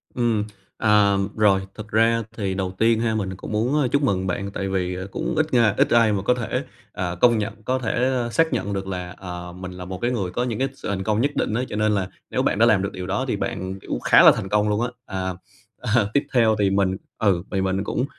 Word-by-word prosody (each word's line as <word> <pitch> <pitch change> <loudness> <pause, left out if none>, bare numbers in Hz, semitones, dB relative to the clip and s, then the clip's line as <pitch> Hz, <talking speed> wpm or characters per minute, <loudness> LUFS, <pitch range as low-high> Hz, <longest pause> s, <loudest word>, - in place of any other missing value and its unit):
Ừm, 115 -4 +1 0.3
à. 105 -2 +4 0.2
Rồi. 100 -3 +4
Thực 105 -1 -8
ra 115 +1 +2
thì 100 -3 -1
đầu 95 -1 -2
tiên 115 +1 +3
ha, 115 -1 0
mình 95 -3 -2
cũng 95 - -8
muốn 125 +6 +1
chúc 140 - +2
mừng 95 -9 0
bạn 100 +2 -3
tại 95 -1 -3
vì 90 -1 -1
cũng - - -3
ít 155 -2 0
nga 115 -4 +4
ít - - +3
ai 115 -2 +4
mà 100 - -1
có 100 - +2
thể, 125 -3 -2 0.3
ờ, 90 -1 -3
công 120 -2 +5
nhận, 110 +1 -4
có 130 +3 0
thể 125 +1 0 0.2
xác 165 +5 +2
nhận 100 - -2
được 95 -1 -3
là, 90 -2 -5
à, 90 -1 -7
mình 90 0 -7
là 90 0 -8
một 95 0 -6
cái 120 - +1
người 100 -7 -2
có 120 - -1
những 115 -4 -3
cái 135 - +1
sự 135 - -7
thành 95 -1 -2
công 105 +3 +1
nhất 140 +3 +1
định - - 0
á. 120 - 0
Cho - - -5
nên 105 0 +2
là 100 -3 0 0.2
nếu - - 0
bạn 100 - 0
đã 115 - +6
làm 110 -5 +4
được 100 - -2
điều 90 0 -6
đó 95 - -1
thì - - 0
bạn, 95 +1 -4
kiểu, - - -4
khá - - +6
là - - +10
thành 95 - -5
công 105 +1 +2
luôn 105 +1 0
á. 120 - +1 0.2
À 95 -1 -3 0.5
à, - - +2
Tiếp 140 - +3
theo 115 -3 +4
thì 100 -1 +3
mình 95 -1 +1 0.2
ừ, 95 -5 +2
thì 95 - 0
mình 95 +1 0
cũng, 125 - -1
105 Hz, 255 wpm, -23 LUFS, 95-115 Hz, 0.5 s, là